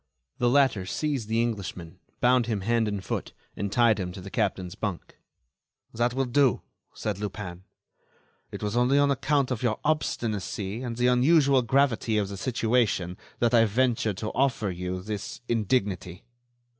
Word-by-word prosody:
The 120 - +3
latter 125 -8 +3
seized 135 -3 -2
the 115 +1 +2
Englishman, 95 -6 -5 0.2
bound 125 -1 +4
him 110 -4 -1
hand 115 +2 +1
and 100 -2 -3
foot, - - -4 0.2
and 100 -1 -3
tied 115 -2 +4
him 90 -2 -3
to 95 - -8
the 95 +1 -9
captain's 90 -2 -1
bunk. 100 -5 -5 0.7
"That 120 +2 0
will 135 0 +1
do," 130 -1 +2 0.3
said 105 -3 -3
Lupin. 95 -3 -6 0.9
"It - - -7
was 105 +2 -2
only 125 +3 +3
on 145 0 +4
account 140 0 +1
of 125 - -2
your 120 -3 0
obstinacy 110 -8 -1
and 120 -2 -4
the 125 - +1
unusual 135 +2 +4
gravity 120 -3 +2
of 100 -2 0
the 100 - -6
situation, 110 -6 0 0.2
that 120 0 +1
I 115 -1 +6
ventured 115 -2 +1
to 110 +3 -3
offer 125 -6 0
you 90 +1 -4
this 105 +2 -5
indignity." 100 -6 -1
115 Hz, 160 wpm, -27 LUFS, 100-125 Hz, 0.9 s, I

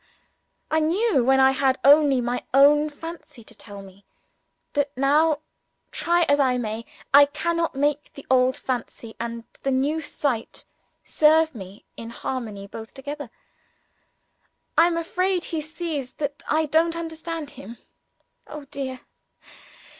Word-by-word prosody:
I 315 - +3
knew 335 - +2
when 265 +2 +4
I 265 0 +6
had 265 -1 +1
only 285 -2 +6
my 245 +1 -2
own 295 +2 +6
fancy 325 -5 -10
to - - -16
tell 200 -2 -11
me. 195 +1 -16 0.7
But 285 -1 0
now, 295 +3 +3 0.5
try 345 +1 +2
as 285 -2 +2
I 255 -3 +3
may, 225 -1 -4 0.3
I 285 +1 +9
cannot 330 +2 -2
make 290 +1 0
the 280 - -11
old 255 0 +3
fancy 240 -2 -5
and 230 0 -5 0.2
the 275 - -1
new 280 +4 0
sight 270 -6 -3 0.4
serve 315 +1 +3
me 195 -3 -11
in 230 - -7
harmony 230 -4 -5
both 220 +2 -10
together. 285 -1 -7 1.5
I 335 - +6
am 340 -1 -1
afraid 365 +2 0
he 320 -2 -3
sees 305 -4 -5
that 285 -1 -4
I 315 +1 +2
don't 325 +2 +2
understand 325 -2 -5
him. 230 +5 -11 0.7
Oh, 300 -2 -9
dear! 260 -2 -5
285 Hz, 140 wpm, -24 LUFS, 250-315 Hz, 1.5 s, I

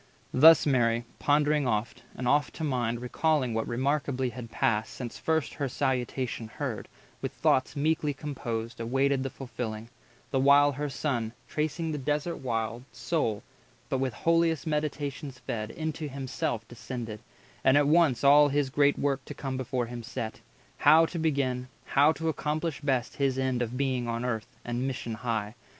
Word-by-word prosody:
Thus 160 +5 +8
Mary, 120 -4 +2
pondering 150 -1 +2
oft, 110 0 -1
and 125 - -3
oft 145 +3 +2
to 160 - -5
mind 120 -5 -1
Recalling 140 -1 +1
what 110 0 -1
remarkably 130 +1 0
had 120 0 -8
passed 110 -1 0
Since 120 -3 -6
first 160 -2 0
her 140 -2 -2
Salutation 125 -3 -1
heard, 110 - -4 0.3
with - - -3
thoughts 130 +3 +2
Meekly 150 0 +1
composed 120 -5 -5
awaited 135 +3 +1
the 135 - -2
fulfilling: 115 -4 -6 0.4
The 135 - +2
while 140 +2 +6
her 145 +2 -3
Son, 120 -6 -2
tracing 155 +2 -2
the 150 - -3
desert 150 +5 -1
wild, 115 -1 -2
Sole, 115 -11 -1 0.5
but 135 - 0
with 130 -4 -1
holiest 165 +1 +2
meditations 150 -3 -3
fed, 110 -3 -4
110 160 - -8
Into 155 0 -2
himself 120 -4 -3
descended, 120 -2 -6 0.4
and 130 +1 +5
at 145 - +4
once 150 -6 +4
All 145 +1 +7
his 145 -1 0
great 145 0 +3
work 140 -2 0
to - - -8
come 135 -2 -4
before 130 -1 -1
him 120 0 -6
set— 115 -2 -5 0.4
How 155 +3 +6
to 170 +1 -5
begin, 135 -5 0 0.2
how 145 +2 +4
to 160 +1 -4
accomplish 155 0 -2
best 130 -5 -1
His 135 -2 +1
end 130 -2 0
of 120 +1 -2
being 130 -3 0
on 115 +1 -2
Earth, 115 -3 -2 0.2
and 120 +2 -1
mission 120 -3 -4
high. 110 -2 -2
130 Hz, 165 wpm, -28 LUFS, 120-145 Hz, 0.5 s, Thus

